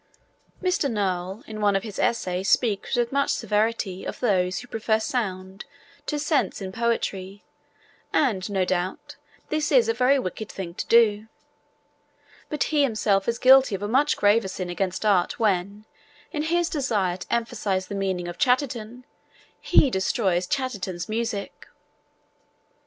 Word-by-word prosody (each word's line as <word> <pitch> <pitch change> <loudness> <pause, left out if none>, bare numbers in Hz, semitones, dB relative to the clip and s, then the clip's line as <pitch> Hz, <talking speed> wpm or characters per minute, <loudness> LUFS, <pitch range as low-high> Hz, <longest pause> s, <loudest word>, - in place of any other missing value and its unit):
Mr. 360 -6 +1
Noel 190 -1 -2
in 215 -1 -7
one 205 -1 +3
of 195 - 0
his 215 -3 -7
essays 190 -4 0
speaks 220 0 +1
with 240 -1 0
much 280 0 +1
severity 210 -3 -1
of - - -6
those 185 -6 +1
who 245 - -7
prefer 220 -1 0
sound 195 -4 -3 0.4
to 300 - -1
sense 295 0 0
in 190 -2 -5
poetry 200 -3 -2 0.7
and, 215 -10 +1
no 190 -2 0
doubt, 180 0 -3 0.3
this 305 0 -1
is 250 -5 +5
a 225 - +2
very 255 +4 +3
wicked 220 -2 -4
thing 180 -3 -6
to - - -5
do; 220 -2 +4 1.2
but 300 - 0
he 295 - +4
himself 215 -6 +1
is 235 0 0
guilty 260 -4 +6
of 195 - -6
a - - -1
much 270 +7 +2
graver 205 +1 +3
sin 185 -1 -5
against 190 +3 -2
art 195 -1 +2
when, 200 0 0 0.5
in 295 - -2
his 340 +2 +1
desire 210 - -1
to 185 - -10
emphasise 205 -5 -1
the 205 - -8
meaning 190 -3 -2
of 175 - -7
Chatterton, 250 -2 0 0.5
he 275 - +4
destroys 190 -3 0
Chatterton's 195 -10 -3
music. 220 -2 -4
215 Hz, 150 wpm, -25 LUFS, 190-245 Hz, 1.2 s, guilty